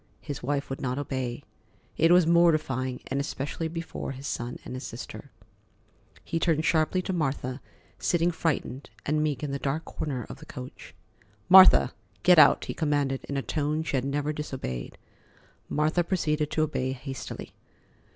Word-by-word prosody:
His 145 -3 -6
wife 140 +2 -1
would 135 - -4
not 130 -1 -2
obey. 130 -4 -3 0.5
It 165 - +4
was 180 -1 +6
mortifying, 155 -7 +2
and 135 - -2
especially 145 +3 -3
before 165 -4 -5
his 135 +1 -9
son 120 -3 -3
and - - -6
his 130 +2 -5
sister. 115 - -8 0.9
He 165 - -2
turned 160 -2 +1
sharply 165 +3 +2
to 190 - -2
Martha, 135 -5 -2 0.4
sitting 175 0 +2
frightened 150 -5 -2 0.2
and 150 +1 +1
meek 150 -1 -1
in 145 - -2
the 140 - -2
dark 145 +4 -2
corner 130 -7 -4
of - - -9
the - - -14
coach. 65 - -10 0.5
"Martha, 190 0 +8 0.3
get 180 -2 +7
out," - - +6
he - - -4
commanded 145 -4 0
in 140 - -3
a 135 - -1
tone 150 +1 -1
she 160 - -2
had 130 - +1
never 145 +2 -1
disobeyed. 130 - -5 0.7
Martha 155 +4 +1
proceeded 155 -4 0
to 155 - +1
obey 130 -4 -1
hastily. 135 +1 -7
145 Hz, 160 wpm, -27 LUFS, 135-160 Hz, 0.9 s, Martha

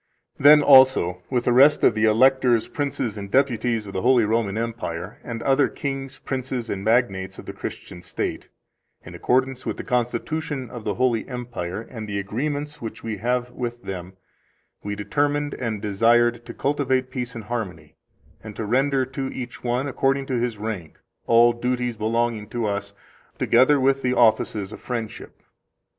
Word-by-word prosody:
Then, 150 +1 +8
also 130 -11 +6
with 125 -2 0
the 125 - +3
rest 140 +4 +6
of - - +6
the 110 +1 +1
Electors, 125 +1 +4
Princes, 130 -7 -3
and 100 0 -7
Deputies 120 -3 +1
of 100 - -9
the 95 - -2
Holy 125 -2 +4
Roman 110 -2 0
Empire, 110 -7 -4
and 115 -1 -6
other 135 0 +3
kings, 135 -2 -5
princes, 130 -3 -4
and 95 -1 -4
magnates 100 -4 +1
of - - -10
the - - -7
Christian 90 - -8
state, - - -4 0.6
in - - -10
accordance 130 +1 0
with - - -3
the - - -5
constitution 130 +2 -2
of 120 -3 -8
the 105 - -1
Holy 125 -3 +1
Empire, 120 -7 -5
and 110 -2 -8
the 100 - -2
agreements 145 +9 -3
which 115 - -7
we 110 -2 -4
have 125 +3 -1
with 120 -1 -5
them, 95 -1 -6 0.7
we 105 0 -4
determined 145 +6 -1
and 110 -4 -4
desired 120 +3 +2
to - - -7
cultivate 130 -2 0
peace 125 -2 -4
and 115 - -6
harmony, 95 -9 -5 0.5
and 110 -2 -9
to 110 - -4
render 135 +4 +2
to 135 +1 -4
each 125 -1 -7
one, 125 +3 0
according 135 0 0
to 130 -3 -1
his 120 -2 -2
rank, 105 -6 -5 0.3
all 120 +1 +6
duties 125 0 -2
belonging 115 0 -1
to 120 0 -2
us, 100 -1 -3 0.4
together 130 +4 +4
with 135 +1 +2
the 125 -1 0
offices 110 -3 +2
of - - -9
friendship. 115 -3 -6
120 Hz, 170 wpm, -23 LUFS, 110-130 Hz, 0.7 s, Then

